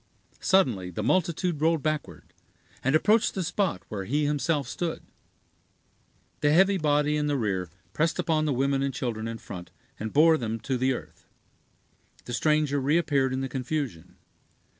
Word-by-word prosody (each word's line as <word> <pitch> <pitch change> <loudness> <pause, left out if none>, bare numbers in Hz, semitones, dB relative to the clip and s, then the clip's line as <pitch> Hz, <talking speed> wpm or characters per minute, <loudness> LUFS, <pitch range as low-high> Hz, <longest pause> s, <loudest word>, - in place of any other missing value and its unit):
Suddenly 125 - +2
the 100 +4 -4
multitude 170 - 0
rolled 160 -2 +2
backward, 155 -1 -4 0.5
and 135 +4 +2
approached 215 +8 +3
the 190 - -1
spot 175 - -1
where 100 -3 -5
he 145 +7 0
himself 145 0 0
stood. 170 -2 -4 1.4
The 145 - +3
heavy 190 +4 +4
body 150 -1 +2
in 150 0 0
the 145 -1 +1
rear 95 -7 -1 0.2
pressed 165 +1 +1
upon 155 -2 +1
the 150 - +1
women 135 +1 +1
and 135 -2 -1
children 115 -4 -3
in 115 0 -5
front, 90 -5 -9 0.3
and 110 0 -4
bore 160 +2 +5
them 115 -2 -3
to 135 - -2
the 130 +1 +1
earth. - - -9 1.0
The 120 - -6
stranger 150 +1 +1
reappeared 140 -2 +2
in 130 +1 -2
the 135 - -2
confusion. 130 - -4
145 Hz, 160 wpm, -27 LUFS, 125-155 Hz, 1.4 s, bore